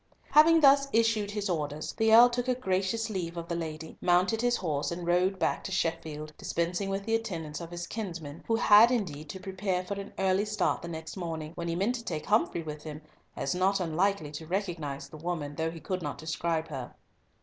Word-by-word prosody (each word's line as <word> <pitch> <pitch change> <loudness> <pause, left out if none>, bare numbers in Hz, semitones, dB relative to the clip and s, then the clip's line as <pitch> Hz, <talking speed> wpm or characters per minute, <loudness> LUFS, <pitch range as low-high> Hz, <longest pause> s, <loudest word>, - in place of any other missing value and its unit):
Having 320 +2 +7
thus 275 -1 +6
issued 225 -3 +2
his 205 0 -2
orders, 155 -4 -3
the 220 -1 +2
Earl 235 +2 +10
took 245 +1 -2
a 255 - +2
gracious 210 0 -1
leave 175 -3 -3
of 170 0 -5
the 170 - -2
lady, 160 -1 -6
mounted 185 +5 +3
his 245 0 +2
horse, 150 -5 -1
and 170 0 -5
rode 180 +2 +2
back - - 0
to 190 - -4
Sheffield, 160 -3 -2
dispensing 175 +4 -1
with 195 0 -2
the 225 - -1
attendance 170 -9 -3
of 170 - -7
his 175 0 -5
kinsman, 170 -9 -6
who 225 - +2
had 225 0 +7
indeed 155 - -2
to 190 - -6
prepare 190 -1 -2
for 200 - -3
an 200 - -10
early 190 +1 +2
start 210 0 0
the - - -6
next 160 +2 -7
morning, 160 -3 -4
when 170 -1 -5
he 165 - -1
meant 200 +7 +1
to 235 -2 -5
take 155 -8 -4
Humfrey 185 -5 +1
with 150 -1 -6
him, 155 -1 -8 0.3
as 135 - -1
not 190 +2 +2
unlikely 175 -1 0
to 155 +1 -7
recognise 170 -7 -3
the 155 - -11
woman, 155 -3 -3
though 160 +2 -1
he 165 0 -8
could 185 +2 -3
not 145 -3 -4
describe 160 +1 -2
her. 130 -5 -6
180 Hz, 215 wpm, -29 LUFS, 160-205 Hz, 0.3 s, Earl